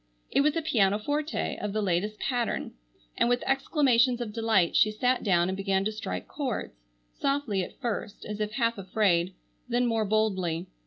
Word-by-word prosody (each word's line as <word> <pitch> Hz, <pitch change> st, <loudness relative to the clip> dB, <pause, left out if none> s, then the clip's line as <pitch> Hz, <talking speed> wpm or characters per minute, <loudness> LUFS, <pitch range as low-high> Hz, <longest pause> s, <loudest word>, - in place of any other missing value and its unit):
It -, -, +3 dB
was 300 Hz, +2 st, +2 dB
a 330 Hz, -, -1 dB
pianoforte 255 Hz, +6 st, 0 dB
of 210 Hz, -1 st, -3 dB
the 215 Hz, -, 0 dB
latest 200 Hz, +3 st, -1 dB
pattern, 245 Hz, -3 st, -1 dB, 0.4 s
and -, -, +2 dB
with 245 Hz, 0 st, +1 dB
exclamations 265 Hz, -3 st, +3 dB
of 230 Hz, -3 st, -4 dB
delight 220 Hz, -6 st, +2 dB
she 215 Hz, -, +5 dB
sat 250 Hz, +4 st, +1 dB
down 175 Hz, -4 st, +3 dB
and 190 Hz, -, -1 dB
began 195 Hz, 0 st, 0 dB
to 215 Hz, -, 0 dB
strike 215 Hz, +1 st, -5 dB
chords, 265 Hz, -7 st, -3 dB, 0.4 s
softly 275 Hz, -8 st, 0 dB
at -, -, -10 dB
first, 230 Hz, -5 st, -4 dB
as 210 Hz, 0 st, -5 dB
if 210 Hz, 0 st, -2 dB
half 230 Hz, -2 st, 0 dB
afraid, 185 Hz, -2 st, +1 dB, 0.3 s
then 245 Hz, +1 st, +2 dB
more 225 Hz, -2 st, +1 dB
boldly. 190 Hz, -5 st, 0 dB
215 Hz, 170 wpm, -28 LUFS, 195-245 Hz, 0.4 s, she